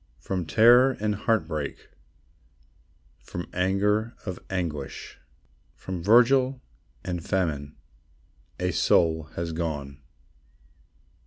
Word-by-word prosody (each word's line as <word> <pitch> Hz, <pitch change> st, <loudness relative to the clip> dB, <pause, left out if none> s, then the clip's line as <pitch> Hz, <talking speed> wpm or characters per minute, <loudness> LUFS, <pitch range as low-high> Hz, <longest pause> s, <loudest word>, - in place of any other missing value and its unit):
From 90 Hz, -4 st, -4 dB
terror 120 Hz, -, +5 dB
and 105 Hz, 0 st, 0 dB
heartbreak, 95 Hz, -9 st, -2 dB, 1.3 s
From 90 Hz, -, -7 dB
anger 105 Hz, +5 st, +1 dB
of 95 Hz, -3 st, -5 dB
anguish, 80 Hz, -8 st, -5 dB, 0.6 s
From 95 Hz, -2 st, -6 dB
vigil 125 Hz, +6 st, +4 dB, 0.4 s
and 90 Hz, -3 st, -4 dB
famine, 75 Hz, -8 st, -2 dB, 0.8 s
A 90 Hz, 0 st, 0 dB
soul 80 Hz, -1 st, +2 dB
has 85 Hz, 0 st, -3 dB
gone. 75 Hz, -4 st, -4 dB
90 Hz, 85 wpm, -26 LUFS, 80-110 Hz, 1.3 s, terror